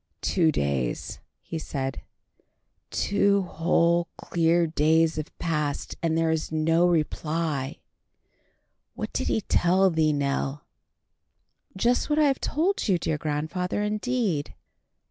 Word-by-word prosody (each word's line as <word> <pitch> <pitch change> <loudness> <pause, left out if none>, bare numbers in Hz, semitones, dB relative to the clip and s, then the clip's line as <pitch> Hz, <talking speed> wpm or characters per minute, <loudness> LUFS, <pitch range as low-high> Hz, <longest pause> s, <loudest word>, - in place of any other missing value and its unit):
"Two 165 -4 +2
days," 70 - -2 0.2
he 165 - -5
said, 135 -3 -4 0.9
"two 200 -1 +2
whole 170 0 +1
clear 170 0 +2
days 160 +1 +2
have 155 0 -4
passed, 150 -3 -2
and 165 -1 +1
there 165 0 +2
is 160 -1 -2
no 165 +2 +3
reply. 155 -3 -1 1.2
What - - -5
did - - -1
he 220 - +1
tell 190 0 +3
thee, 160 -1 +2
Nell?" 140 0 -1 1.1
"Just 240 +8 +1
what 300 - +1
I 305 - +5
have 275 -2 +1
told 350 +4 0
you, 190 -4 +3
dear 155 -2 -2
grandfather, 160 +6 -2
indeed." 210 - -1
165 Hz, 120 wpm, -26 LUFS, 155-185 Hz, 1.2 s, I